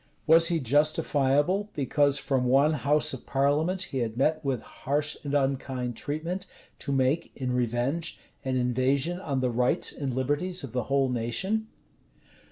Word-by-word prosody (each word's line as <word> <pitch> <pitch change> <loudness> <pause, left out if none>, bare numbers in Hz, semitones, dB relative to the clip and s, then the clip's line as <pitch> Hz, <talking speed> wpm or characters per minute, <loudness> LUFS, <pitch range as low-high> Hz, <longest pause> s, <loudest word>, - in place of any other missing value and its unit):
Was 165 +1 +6
he 170 -2 +1
justifiable, 150 - +2
because 145 0 +3
from 130 -3 0
one 140 +5 +4
house 150 +2 +2
of 130 - -8
parliament 150 +7 +1
he 135 - -4
had 115 -1 -3
met 155 +4 +1
with 135 -4 -2
harsh 145 +2 -2
and 145 -1 -2
unkind 130 -3 -1
treatment, 165 - -4 0.3
to 140 - -4
make, 135 +5 +1
in 130 -2 -3
revenge, 125 +7 -1 0.3
an 130 -2 -1
invasion 130 +7 +1
on 140 -8 -2
the 125 -1 0
rights 125 +1 +1
and 140 -2 -3
liberties 145 +8 -2
of 135 - -7
the 125 -2 -2
whole 135 -1 +1
nation? 125 - -1
140 Hz, 155 wpm, -27 LUFS, 130-155 Hz, 0.3 s, Was